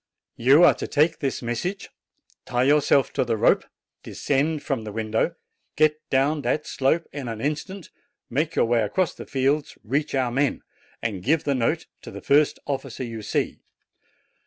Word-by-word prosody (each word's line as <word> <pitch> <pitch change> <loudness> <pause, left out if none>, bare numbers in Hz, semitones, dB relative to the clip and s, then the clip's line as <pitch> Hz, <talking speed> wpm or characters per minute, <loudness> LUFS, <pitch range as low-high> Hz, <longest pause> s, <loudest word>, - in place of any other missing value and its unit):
You 135 +8 +6
are 175 - +8
to - - -6
take 155 +2 +2
this 135 -3 -2
message, 150 - -3 0.6
tie 125 0 +1
yourself 140 -1 +3
to - - +1
the 115 -2 -1
rope, - - +3 0.4
descend 145 +2 -1
from 130 -6 -2
the 105 - -6
window, 110 +9 -1 0.4
get 155 0 +3
down 140 +3 +2
that 150 +2 -1
slope 150 +5 0
in 140 -4 -5
an 115 -2 -5
instant, 155 - -4 0.4
make 155 +6 -1
your - - +3
way 115 0 +2
across 160 - 0
the - - -10
fields, 140 +3 0
reach 140 +6 -1
our 130 -2 +1
men, 135 +3 0 0.4
and 105 -5 -2
give 150 - +1
the 140 - +1
note 125 -3 0 0.2
to - - -10
the - - -8
first 145 +1 +3
officer 135 -3 -4
you 115 -2 -6
see. 105 - -2
140 Hz, 170 wpm, -24 LUFS, 120-150 Hz, 0.6 s, are